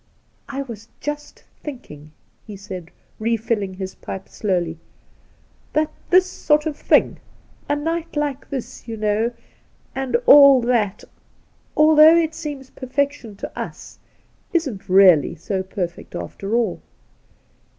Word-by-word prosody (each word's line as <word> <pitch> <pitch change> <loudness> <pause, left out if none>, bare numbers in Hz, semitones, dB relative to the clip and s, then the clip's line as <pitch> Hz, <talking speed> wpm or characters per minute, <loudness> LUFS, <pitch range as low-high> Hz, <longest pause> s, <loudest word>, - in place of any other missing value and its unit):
' - - -40
I 275 0 -3
was 225 -4 -10
just 295 0 -6 0.2
thinking,' 155 - -9 0.4
he 210 -2 -8
said, 185 -4 -8 0.3
refilling 220 -3 -1
his 190 0 -6
pipe 190 0 -8
slowly, 175 -5 -2 0.5
' - - -35
that 305 0 +1 0.2
this 370 +1 +6
sort 300 -4 +1
of 310 -2 -2
thing - - +2 0.5
^a 290 0 +1
night 330 +2 -3
like 290 -2 -2
this, 255 -2 -6
you 225 -1 -5
know, 215 +2 +1 0.6
and 265 - 0
aU 280 -3 +9
that 235 -5 0 0.4
— - - -38
although 310 +1 +7
it 325 -1 +1
seems 285 -4 -7
perfec 275 +2 -1
tion 230 -8 -12
to - - -8
us, - - -8 0.5
isn't 270 - -2
really 180 -5 +6
so 190 +4 -3
perfect 185 -2 -5
after 195 - -4
all. 235 -2 0
235 Hz, 135 wpm, -21 LUFS, 195-295 Hz, 0.6 s, aU